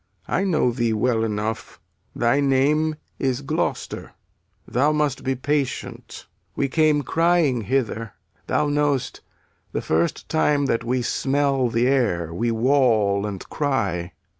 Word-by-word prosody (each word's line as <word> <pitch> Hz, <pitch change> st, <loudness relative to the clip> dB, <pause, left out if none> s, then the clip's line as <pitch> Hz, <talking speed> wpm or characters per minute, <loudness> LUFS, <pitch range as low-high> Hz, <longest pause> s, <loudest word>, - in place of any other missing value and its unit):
I -, -, 0 dB
know 155 Hz, -9 st, +2 dB
thee 120 Hz, -2 st, 0 dB
well 110 Hz, +1 st, +1 dB
enough; 110 Hz, 0 st, -3 dB, 0.4 s
thy 120 Hz, +4 st, +2 dB
name 145 Hz, +3 st, +2 dB, 0.2 s
is 135 Hz, 0 st, -1 dB
Gloucester. 140 Hz, -, -3 dB, 0.5 s
Thou 140 Hz, +5 st, +2 dB
must 150 Hz, -3 st, 0 dB
be 135 Hz, 0 st, 0 dB
patient. 145 Hz, +1 st, -3 dB, 0.3 s
We 140 Hz, -, 0 dB
came 155 Hz, -1 st, +3 dB
crying 165 Hz, -7 st, +2 dB
hither; 115 Hz, -2 st, -2 dB, 0.3 s
Thou 150 Hz, -, +1 dB
know'st, 145 Hz, -3 st, 0 dB, 0.5 s
the -, -, -1 dB
first 80 Hz, +2 st, 0 dB
time 150 Hz, -2 st, +2 dB
that 115 Hz, -3 st, 0 dB
we 125 Hz, +1 st, -1 dB
smell 135 Hz, 0 st, +1 dB
the 115 Hz, +1 st, +1 dB
air 95 Hz, -, +1 dB
We 115 Hz, +8 st, -1 dB
wawl 110 Hz, -5 st, +2 dB
and 100 Hz, -3 st, -6 dB
cry. 100 Hz, -, -1 dB
130 Hz, 130 wpm, -23 LUFS, 115-145 Hz, 0.5 s, came